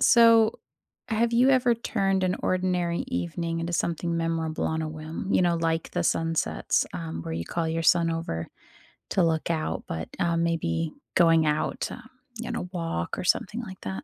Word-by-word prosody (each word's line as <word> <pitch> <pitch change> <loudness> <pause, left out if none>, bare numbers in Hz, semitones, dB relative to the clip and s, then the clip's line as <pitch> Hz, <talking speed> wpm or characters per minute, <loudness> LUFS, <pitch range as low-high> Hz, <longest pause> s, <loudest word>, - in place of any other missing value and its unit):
so 230 -1 +6 0.5
have 230 +1 +1
you 250 +3 +5
ever 250 -3 +4
turned 195 -4 0
an 185 - +1
ordinary 180 -2 0
evening 165 - -2
into 170 +1 -3
something 170 0 -1
memorable 165 -1 -1
on 160 0 -1
a 155 - -3
whim? 155 +5 -5
You - - +4
know, 170 -1 +2
like 165 0 -1
the 175 - -1
sunsets, 165 0 +1
um, 85 -1 -5
where 80 - -4
you 85 - -3
call 165 - -2
your 165 +1 -1
son 165 0 +4
over 165 - -3 0.7
to 185 - +3
look 160 0 +1
out, 155 - -1
but, 80 0 -4
uh, 170 -1 +1
maybe 85 - 0 0.2
going 165 -2 +5
out 150 0 0
to, - - -4 0.4
you 235 +1 -4
know, 210 -6 -4
walk 165 - -3
or - - -3
something 210 +5 +1
like 190 -5 -9
that. 95 0 -5
165 Hz, 180 wpm, -26 LUFS, 160-185 Hz, 0.7 s, so